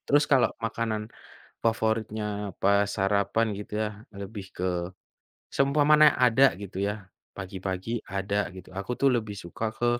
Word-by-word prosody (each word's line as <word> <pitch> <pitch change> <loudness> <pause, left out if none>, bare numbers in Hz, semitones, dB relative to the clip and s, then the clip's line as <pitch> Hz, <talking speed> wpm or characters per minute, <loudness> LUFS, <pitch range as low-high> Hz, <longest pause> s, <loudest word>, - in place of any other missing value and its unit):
Terus 145 +1 +5
kalau 130 - +5 0.2
makanan 110 -1 -2 0.6
favoritnya 110 -2 -1
pas 100 +1 +4
sarapan 100 +3 +2
gitu 105 +1 -8
ya, 110 - 0 0.2
lebih 100 0 -7
ke 90 - -3 0.9
seumpamanya 150 +2 +5
ada, 130 +2 +6
gitu 100 -2 -8
ya, 105 -1 -3 0.3
pagi-pagi 95 +2 -4 0.2
ada 100 0 -1
gitu, 95 -1 -11
aku 100 +5 -4
tuh 140 - +4
lebih 110 -3 -2
suka 85 +6 -5
ke 120 - +1
105 Hz, 130 wpm, -27 LUFS, 100-115 Hz, 0.9 s, ada